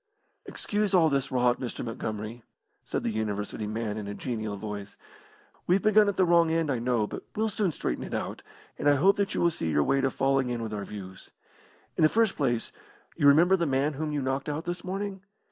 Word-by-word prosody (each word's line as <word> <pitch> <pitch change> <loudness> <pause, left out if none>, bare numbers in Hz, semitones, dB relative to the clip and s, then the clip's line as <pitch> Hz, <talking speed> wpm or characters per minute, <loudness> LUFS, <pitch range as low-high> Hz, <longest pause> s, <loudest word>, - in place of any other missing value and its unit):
"Excuse 205 -2 -1
all 165 -3 +5
this 135 -2 -1
rot, 125 -1 +2
Mr. 125 - -4
Montgomery," 110 0 -5 0.4
said - - -3
the - - 0
University 105 0 -3
man, 110 0 -3
in 105 - -6
a 100 - -5
genial 110 -2 -4
voice. 100 -1 -7 0.7
"We've 185 +2 +3
begun 215 -1 +5
at 200 - -3
the 185 - +4
wrong 170 -1 +4
end, 160 -2 +1
I 125 - 0
know, 120 -2 +1
but - - -6
we'll 220 +1 +1
soon 200 -3 0
straighten - - -3
it - - -7
out, - - -4 0.4
and 145 - +3
I 145 - +5
hope 190 +8 +4
that 200 0 0
you - - 0
will 170 - +4
see 80 - -3
your 75 -2 +2
way 135 - +2
to 135 - +2
falling 135 -1 +1
in 120 -1 -2
with 110 -1 -5
our 100 -1 -4
views. 95 -3 -9 0.7
In - - +1
the 155 - +6
first 225 0 +2
place, 120 -5 0 0.4
you 145 - +3
remember 170 +6 +6
the 170 -3 0
man 140 +2 +1
whom 150 +2 -3
you 145 -2 -1
knocked 135 +3 -2
out 150 +3 -3
this 175 0 -4
morning? 195 +1 -4
135 Hz, 220 wpm, -28 LUFS, 110-175 Hz, 0.7 s, the